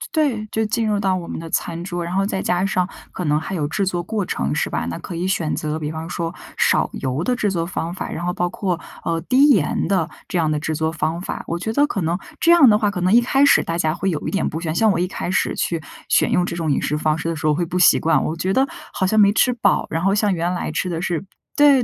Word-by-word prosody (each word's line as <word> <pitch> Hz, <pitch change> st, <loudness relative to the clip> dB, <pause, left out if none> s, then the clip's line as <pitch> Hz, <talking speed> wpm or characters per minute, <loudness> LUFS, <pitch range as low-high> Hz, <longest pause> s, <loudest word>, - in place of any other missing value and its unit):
对， 270 Hz, -9 st, +1 dB
就 220 Hz, -, 0 dB
进 220 Hz, +1 st, 0 dB
入 205 Hz, -1 st, +1 dB
到 190 Hz, -2 st, +1 dB
我 175 Hz, -2 st, -5 dB
们 -, -, -5 dB
的 165 Hz, 0 st, -8 dB
餐 170 Hz, +1 st, -2 dB
桌， 175 Hz, -1 st, -4 dB
然 170 Hz, -, -5 dB
后 195 Hz, +1 st, +2 dB
再 195 Hz, -1 st, -2 dB
加 180 Hz, -1 st, 0 dB
上， 185 Hz, -2 st, +1 dB, 0.2 s
可 180 Hz, -, -5 dB
能 150 Hz, 0 st, +2 dB
还 190 Hz, +4 st, -4 dB
有 150 Hz, -4 st, -1 dB
制 200 Hz, +7 st, -1 dB
作 180 Hz, -2 st, -1 dB
过 205 Hz, +2 st, -2 dB
程 70 Hz, -, -2 dB
是 -, -, -1 dB
吧， -, -, -2 dB
那 85 Hz, -, -4 dB
可 175 Hz, -, -7 dB
以 175 Hz, +2 st, -2 dB
选 170 Hz, -5 st, 0 dB
择 155 Hz, 0 st, -3 dB
比 150 Hz, -1 st, -3 dB
方 160 Hz, +1 st, -6 dB
说， 170 Hz, -1 st, -3 dB, 0.2 s
少 -, -, +3 dB
油 130 Hz, +5 st, -2 dB
的 250 Hz, -, +1 dB
制 210 Hz, -4 st, 0 dB
作 170 Hz, -3 st, -1 dB
方 170 Hz, -1 st, -3 dB
法， 185 Hz, -, -5 dB
然 170 Hz, -, -5 dB
后 180 Hz, -, 0 dB
包 175 Hz, 0 st, -1 dB
括， 180 Hz, -1 st, -2 dB, 0.2 s
呃， 165 Hz, -1 st, -1 dB
低 265 Hz, -, +4 dB
盐 175 Hz, -, +2 dB
的， 185 Hz, -5 st, +1 dB, 0.2 s
这 180 Hz, -, -2 dB
样 160 Hz, -2 st, +1 dB
的 150 Hz, -, 0 dB
制 155 Hz, +1 st, -2 dB
作 160 Hz, +1 st, 0 dB
方 160 Hz, 0 st, -2 dB
法。 180 Hz, -, -5 dB
我 170 Hz, -, -2 dB
觉 220 Hz, +6 st, -3 dB
得 290 Hz, +3 st, +3 dB
可 195 Hz, -, -3 dB
能 165 Hz, +2 st, 0 dB, 0.2 s
这 335 Hz, -, +4 dB
样 330 Hz, -7 st, +8 dB
的 210 Hz, -, +5 dB
话， 210 Hz, -1 st, +1 dB
可 180 Hz, -, -4 dB
能 185 Hz, +2 st, +2 dB
一 235 Hz, -, +7 dB
开 270 Hz, +3 st, +2 dB
始 285 Hz, -, +5 dB
大 165 Hz, -, -3 dB
家 160 Hz, -2 st, +1 dB
会 195 Hz, +1 st, -1 dB
有 155 Hz, -, -4 dB
一 -, -, 0 dB
点 195 Hz, -, 0 dB
不 160 Hz, +2 st, -4 dB
喜 170 Hz, -, -4 dB
欢 155 Hz, -, -1 dB
像 220 Hz, +3 st, +4 dB
我 190 Hz, -, 0 dB
一 180 Hz, -, +1 dB
开 180 Hz, -, -4 dB
始 -, -, 0 dB
去， 165 Hz, -2 st, -1 dB, 0.3 s
选 -, -, +3 dB
用 180 Hz, -, +2 dB
这 170 Hz, -, -4 dB
种 165 Hz, -3 st, -1 dB
饮 -, -, +2 dB
食 150 Hz, -, -1 dB
方 155 Hz, 0 st, +1 dB
式 160 Hz, -, -4 dB
的 165 Hz, -, -1 dB
时 155 Hz, +1 st, -2 dB
候 150 Hz, -, +3 dB
会 170 Hz, +2 st, 0 dB
不 180 Hz, +2 st, -2 dB
习 180 Hz, -, +6 dB
惯， 165 Hz, -, +2 dB
我 160 Hz, -, -3 dB
觉 190 Hz, +3 st, -1 dB
得 265 Hz, +4 st, +3 dB, 0.3 s
好 190 Hz, -, 0 dB
像 215 Hz, +3 st, +2 dB
没 200 Hz, -1 st, +6 dB
吃 250 Hz, -, +3 dB
饱， 225 Hz, -5 st, +1 dB
然 165 Hz, +1 st, -2 dB
后 195 Hz, +1 st, +3 dB
像 210 Hz, 0 st, +2 dB
原 175 Hz, 0 st, -1 dB
来 180 Hz, -, -3 dB
吃 185 Hz, -, -2 dB
的 165 Hz, -1 st, -3 dB
是 175 Hz, 0 st, -2 dB, 0.3 s
对 285 Hz, -3 st, +5 dB
175 Hz, 320 characters per minute, -21 LUFS, 165-200 Hz, 0.3 s, 样